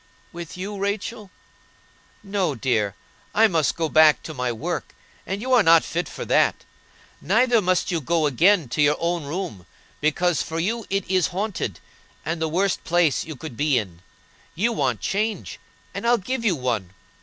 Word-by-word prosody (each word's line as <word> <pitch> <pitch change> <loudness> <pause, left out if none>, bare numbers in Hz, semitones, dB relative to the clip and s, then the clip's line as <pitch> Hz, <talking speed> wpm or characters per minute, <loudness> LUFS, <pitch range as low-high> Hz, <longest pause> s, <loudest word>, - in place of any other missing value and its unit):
"With 170 0 -8
you, 200 +2 -5
Rachel?" 205 +1 -3 0.9
"No, 195 -7 -1
dear, 110 -6 0 0.4
I 225 +1 +6
must 165 -7 +1
go 165 -1 -1
back 155 -1 +5
to 155 - -7
my 125 -3 -2
work, 110 -1 -4 0.3
and 195 +3 -3
you 260 0 0
are 245 - +7
not 165 -3 +6
fit 175 +2 -3
for - - -6
that. - - +2 0.6
Neither 235 0 +3
must 185 0 +1
you 170 -2 -1
go 160 +3 +1
again 165 +4 +3
to 150 - -1
your 150 0 +4
own 170 -2 -1
room, 145 - -5 0.3
because 160 +3 +1
for 165 0 -4
you 220 +6 -2
it 195 -1 -1
is 185 -2 +2
haunted, 185 - -3 0.5
and 165 0 -2
the 160 - 0
worst 185 +4 0
place 170 -4 +2
you 155 - -7
could 135 -2 -8
be 145 0 +2
in. 90 -7 -4 0.5
You 230 +7 +1
want - - -1
change, 215 +2 -2 0.3
and 235 - -3
I'll 240 0 +5
give 235 +5 -3
you 205 -6 +2
one. 115 - -3
170 Hz, 175 wpm, -23 LUFS, 150-200 Hz, 0.9 s, are